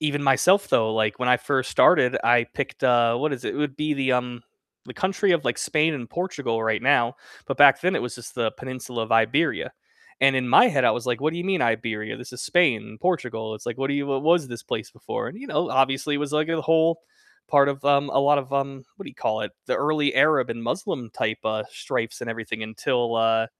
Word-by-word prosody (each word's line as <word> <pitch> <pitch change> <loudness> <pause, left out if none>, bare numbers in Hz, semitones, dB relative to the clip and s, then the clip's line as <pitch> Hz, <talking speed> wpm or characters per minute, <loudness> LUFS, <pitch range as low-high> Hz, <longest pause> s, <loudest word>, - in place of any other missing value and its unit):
even 145 -2 -1
myself 180 +9 +3
though, 110 -1 +2
like, 110 -1 0
when 125 0 -1
I 125 - +5
first 130 -2 -1
started, 125 +1 +4
I 120 0 +4
picked, 140 - -4
uh 120 -2 +3
what 145 +4 -1
is 125 -2 -6
it? - - -3
It - - -5
would 145 -2 -2
be 150 0 -1
the, 135 -2 0
um, 125 -1 -2 0.4
the - - -10
country 195 +1 +1
of, 165 -4 0
like, 120 - -1
Spain 155 +1 +1
and 120 -4 -7
Portugal 140 -11 -3
right 110 -1 0
now, 125 -3 +2 0.3
but - - -3
back 140 -1 +7
then 185 +2 +1
it - - -2
was 125 0 -5
just 120 - -11
the 115 -3 0
Peninsula 125 -2 -6
of 110 - -14
Iberia, 115 +9 +1 0.5
and 135 0 +4
in 125 -1 -1
my 190 - +6
head 135 - +1
I - - +5
was 120 - -4
like, 125 0 -1
"What 155 +3 0
do - - -6
you 175 - -4
mean 190 -2 0
Iberia? 110 -2 -2
This 125 0 -11
is 125 - -9
Spain, 130 - +1
Portugal." 120 -11 -2
It's - - -15
like, 120 - -4
"What 135 0 -1
do 140 - -1
you 140 0 -2
what 135 -1 -2
what 165 +3 +5
was 165 -5 -1
this 120 -2 -8
place - - -5
before?" - - -5
you 265 +6 -10
know, 175 - -1
obviously 135 +2 +1
it - - -3
was 145 0 -4
like 155 0 +1
a 165 -1 -1
whole 165 +1 +2 0.5
part 140 -2 +4
of 140 0 -4
um, 140 0 +3
a - - +1
lot 145 +1 +4
of, 135 0 -6
um, 135 -1 -2
what 195 - -9
do - - -9
you - - -22
call 110 0 -1
it? 105 - -5 0.2
The - - 0
early 150 0 0
Arab 150 -4 +3
and 115 0 -5
Muslim 120 - -4
type, 110 +1 -2
uh, 110 -1 -1
stripes 115 - -4
and 115 - -5
everything 110 -1 -6
until, 115 +2 -1
uh 115 0 +2
130 Hz, 245 wpm, -24 LUFS, 115-150 Hz, 0.5 s, back